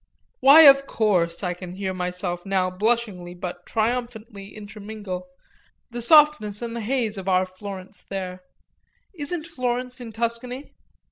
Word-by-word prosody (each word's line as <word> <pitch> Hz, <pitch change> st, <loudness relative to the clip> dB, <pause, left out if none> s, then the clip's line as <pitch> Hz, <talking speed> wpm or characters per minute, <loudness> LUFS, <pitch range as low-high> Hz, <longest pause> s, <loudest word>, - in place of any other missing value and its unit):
"Why, 285 Hz, +4 st, +9 dB
of 275 Hz, -2 st, +8 dB
course," 180 Hz, -6 st, +1 dB
I 180 Hz, -1 st, 0 dB
can 180 Hz, 0 st, -9 dB
hear 190 Hz, 0 st, -3 dB
myself 180 Hz, -1 st, -3 dB
now 190 Hz, -2 st, 0 dB
blushingly 200 Hz, -3 st, -1 dB
but 175 Hz, 0 st, -7 dB
triumphantly 225 Hz, -3 st, -3 dB
intermingle 205 Hz, -3 st, -7 dB, 0.6 s
"the 240 Hz, 0 st, -5 dB
softness 290 Hz, -6 st, +4 dB
and 235 Hz, 0 st, -4 dB
the 235 Hz, -, -3 dB
haze 225 Hz, -3 st, -1 dB
of 190 Hz, 0 st, -4 dB
our 185 Hz, 0 st, +3 dB
Florence 190 Hz, +1 st, -9 dB
there: 185 Hz, -2 st, -5 dB, 0.7 s
isn't 310 Hz, 0 st, -4 dB
Florence 250 Hz, -2 st, -3 dB
in 235 Hz, -2 st, -7 dB
Tuscany?" 235 Hz, +4 st, -4 dB
210 Hz, 135 wpm, -24 LUFS, 185-245 Hz, 0.7 s, Why